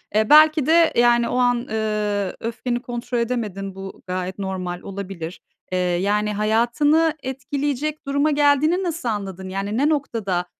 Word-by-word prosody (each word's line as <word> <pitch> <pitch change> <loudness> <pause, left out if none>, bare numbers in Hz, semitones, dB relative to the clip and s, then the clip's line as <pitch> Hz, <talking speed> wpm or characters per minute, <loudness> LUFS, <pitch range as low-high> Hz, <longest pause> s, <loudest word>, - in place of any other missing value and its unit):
eee, 215 0 +2
belki 310 -1 +7
de, 330 0 +4
yani, 240 0 +4
o 250 - -1
an, 245 -1 +3
ııı, 210 -3 -1
öfkeni 240 +1 -3
kontrol 245 0 -4
edemedin. 210 -5 -3
Bu 195 0 -9
gayet 185 +1 -4
normal, 185 -2 -4
olabilir. 190 -4 -7 0.3
Eee, 185 - 0
yani, 200 +4 0
hayatını 240 +10 +2
etkileyecek 280 +3 -3
duruma 285 +2 +2
geldiğini 295 +5 +3
nasıl 330 -8 -2
anladın? 190 -3 -4
Yani 200 +3 -3
ne 290 +3 +3
noktada 220 - -1
235 Hz, 140 wpm, -22 LUFS, 195-285 Hz, 0.3 s, belki